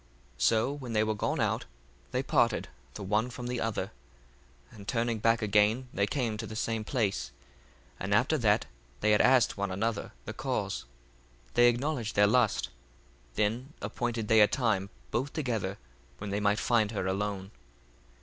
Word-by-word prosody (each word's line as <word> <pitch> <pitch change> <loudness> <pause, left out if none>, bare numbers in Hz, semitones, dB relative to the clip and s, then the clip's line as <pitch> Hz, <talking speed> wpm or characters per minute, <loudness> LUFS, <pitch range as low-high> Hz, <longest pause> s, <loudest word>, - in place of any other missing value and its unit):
1:14 - - -13
So 115 +4 +3
when 130 -5 -6
they 110 -1 +3
were 110 0 0
gone 105 - -1
out, - - 0 0.4
they - - -1
parted - - +2 0.3
the 105 - -6
one 105 +5 +1
from 125 0 -7
the 125 0 -2
other, 110 -2 -2 0.8
and 105 -3 -12
turning 115 -1 0
back 115 +1 +2
again 105 +5 +3
they 100 +1 +1
came 115 -4 -1
to - - -5
the 110 - -7
same 115 -1 -1
place; 105 - -1 0.7
and - - -4
after - - +3
that - - +3 0.4
they 105 - +3
had 105 - +5
asked 125 -4 +4
one 100 0 -1
another 100 +3 -2
the - - -5
cause, - - -2 0.7
they 120 0 +6
acknowledged 120 -2 -1
their 105 - +6
lust: 115 +1 +2 0.7
then 120 +7 -1
appointed 115 +1 -3
they 110 0 +6
a 105 - +8
time 105 -7 0 0.2
both 130 +4 -1
together, 110 - -2 0.4
when 100 -1 -5
they 100 - 0
might 105 0 +2
find 110 -2 +2
her 100 -4 -3
alone. 95 0 -2
110 Hz, 170 wpm, -30 LUFS, 105-120 Hz, 0.8 s, a